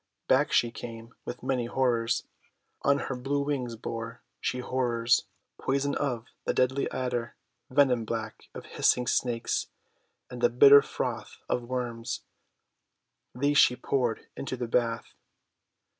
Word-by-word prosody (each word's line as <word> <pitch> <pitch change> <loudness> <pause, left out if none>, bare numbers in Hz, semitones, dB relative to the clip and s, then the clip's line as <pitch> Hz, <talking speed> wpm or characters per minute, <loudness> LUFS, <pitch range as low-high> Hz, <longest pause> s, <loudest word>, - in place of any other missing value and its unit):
Back - - +3
she 120 - +3
came 115 0 -9
with 125 - -6
many 125 -3 0
horrors. 120 -3 +1 0.6
On 140 0 +3
her 135 - -3
blue 140 +3 -1
wings 130 -5 -2
bore 115 0 -6 0.2
she - - -1
horrors 120 -2 +1 0.2
— - - -54
poison 140 +1 0
of 120 -5 -2 0.2
the - - -1
deadly 130 +2 +2
Adder, 120 -2 -3 0.3
venom 130 -3 +3
black 110 -1 -5
of - - -7
hissing 125 - +2
Snakes, 120 -1 0 0.6
and - - -8
the 480 - +5
bitter 430 -1 +8
froth - - -4
of 125 - 0
Worms. 120 -2 -3 1.1
These 145 +3 +3
she 125 - +6
poured 125 -3 -1
into 130 -1 -4
the 120 -1 -3
bath. 115 -1 0
125 Hz, 135 wpm, -28 LUFS, 115-135 Hz, 1.1 s, bitter